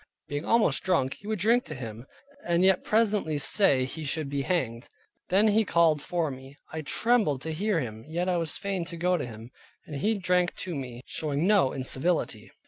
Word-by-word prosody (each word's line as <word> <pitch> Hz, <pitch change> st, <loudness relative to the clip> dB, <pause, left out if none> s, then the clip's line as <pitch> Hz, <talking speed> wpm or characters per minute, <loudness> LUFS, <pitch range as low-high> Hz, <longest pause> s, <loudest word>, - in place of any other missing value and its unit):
Being 145 Hz, +2 st, -4 dB
almost 230 Hz, -1 st, +3 dB
drunk, 170 Hz, -8 st, +1 dB
he 200 Hz, -, -11 dB
would 220 Hz, 0 st, -1 dB
drink 230 Hz, +6 st, +3 dB
to -, -, -7 dB
him, 115 Hz, 0 st, -8 dB, 0.4 s
and 170 Hz, +1 st, +2 dB
yet 190 Hz, -1 st, +4 dB
presently 210 Hz, -8 st, +1 dB
say 140 Hz, -3 st, +3 dB
he 155 Hz, +5 st, -7 dB
should 150 Hz, 0 st, -1 dB
be 140 Hz, -1 st, -1 dB
hanged. 130 Hz, -7 st, -2 dB, 0.4 s
Then 205 Hz, +4 st, +4 dB
he 220 Hz, +2 st, +4 dB
called 165 Hz, -5 st, +3 dB
for 170 Hz, -2 st, -1 dB
me. 135 Hz, +2 st, -11 dB, 0.2 s
I 160 Hz, -, -3 dB
trembled 200 Hz, -, +1 dB
to 160 Hz, -, -3 dB
hear 200 Hz, +2 st, 0 dB
him, 110 Hz, -5 st, -5 dB
yet 170 Hz, +3 st, -2 dB
I 180 Hz, -1 st, +1 dB
was 165 Hz, -3 st, -2 dB
fain 195 Hz, -3 st, -2 dB
to 170 Hz, 0 st, -7 dB
go 180 Hz, +2 st, +2 dB
to 150 Hz, -7 st, -3 dB
him, 115 Hz, +1 st, -10 dB, 0.3 s
and 150 Hz, -, -6 dB
he 215 Hz, +10 st, +1 dB
drank 180 Hz, -2 st, +1 dB
to 180 Hz, -, -5 dB
me, 125 Hz, -4 st, -6 dB
showing 150 Hz, +1 st, -2 dB
no 200 Hz, -9 st, +4 dB
incivility. 135 Hz, +6 st, -1 dB
165 Hz, 200 wpm, -27 LUFS, 135-190 Hz, 0.4 s, yet